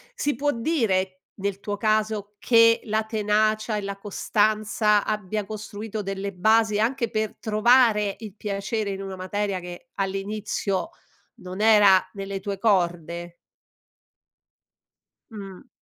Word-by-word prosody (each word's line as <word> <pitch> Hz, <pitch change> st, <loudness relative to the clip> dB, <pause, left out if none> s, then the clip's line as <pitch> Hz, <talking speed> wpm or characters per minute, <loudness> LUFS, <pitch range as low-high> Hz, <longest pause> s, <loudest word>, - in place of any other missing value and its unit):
si 290 Hz, -2 st, -1 dB
può 290 Hz, +4 st, +1 dB
dire, 215 Hz, -, 0 dB
nel 200 Hz, -1 st, -3 dB
tuo 205 Hz, 0 st, -4 dB
caso, 215 Hz, -1 st, 0 dB
che 230 Hz, -1 st, +5 dB
la 220 Hz, 0 st, 0 dB
tenacia 215 Hz, 0 st, +1 dB
e 210 Hz, -, -2 dB
la 200 Hz, 0 st, -5 dB
costanza 210 Hz, +1 st, +1 dB
abbia 210 Hz, -1 st, -2 dB
costruito 215 Hz, +1 st, -6 dB
delle 195 Hz, 0 st, -4 dB
basi, 215 Hz, +3 st, +3 dB
anche 235 Hz, +2 st, 0 dB
per 220 Hz, -1 st, -2 dB
trovare 215 Hz, -2 st, +3 dB
il 215 Hz, -3 st, -9 dB
piacere 205 Hz, +1 st, -3 dB
in 195 Hz, 0 st, -4 dB
una 195 Hz, -1 st, -6 dB
materia 195 Hz, +1 st, -2 dB
che 180 Hz, +7 st, -10 dB
all'inizio 195 Hz, -1 st, -2 dB, 0.5 s
non 185 Hz, +2 st, -7 dB
era 205 Hz, -4 st, +6 dB
nelle 195 Hz, -1 st, -5 dB
tue 195 Hz, +1 st, -4 dB
corde? 175 Hz, -4 st, 0 dB, 2.0 s
Mh. 195 Hz, -3 st, -10 dB
210 Hz, 120 wpm, -24 LUFS, 195-220 Hz, 2.0 s, era